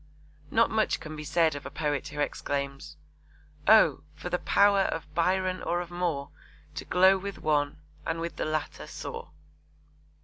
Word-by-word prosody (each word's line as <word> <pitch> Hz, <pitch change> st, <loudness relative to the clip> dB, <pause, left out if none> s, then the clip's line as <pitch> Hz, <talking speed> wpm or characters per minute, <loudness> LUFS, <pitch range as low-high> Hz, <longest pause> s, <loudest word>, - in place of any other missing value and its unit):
Not 230 Hz, +1 st, +3 dB
much 220 Hz, -1 st, +1 dB
can 155 Hz, -1 st, -8 dB
be 155 Hz, -, -6 dB
said 160 Hz, +1 st, +2 dB
of 145 Hz, 0 st, -6 dB
a -, -, -6 dB
poet 145 Hz, -3 st, -2 dB
who 150 Hz, 0 st, -7 dB
exclaims: 140 Hz, -1 st, -3 dB, 0.7 s
Oh, -, -, +6 dB
for -, -, -7 dB
the -, -, +1 dB
power 200 Hz, 0 st, +4 dB
of 165 Hz, -5 st, -2 dB
Byron 185 Hz, +2 st, +1 dB
or 175 Hz, -, 0 dB
of 175 Hz, -1 st, -6 dB
Moore, 170 Hz, -6 st, -2 dB, 0.4 s
To -, -, -6 dB
glow 190 Hz, +2 st, +5 dB
with 200 Hz, +1 st, -6 dB
one, 145 Hz, -1 st, 0 dB, 0.2 s
and 165 Hz, -, -2 dB
with 170 Hz, 0 st, -4 dB
the -, -, -1 dB
latter 155 Hz, 0 st, -3 dB
soar. -, -, -7 dB
165 Hz, 165 wpm, -28 LUFS, 150-185 Hz, 0.7 s, Oh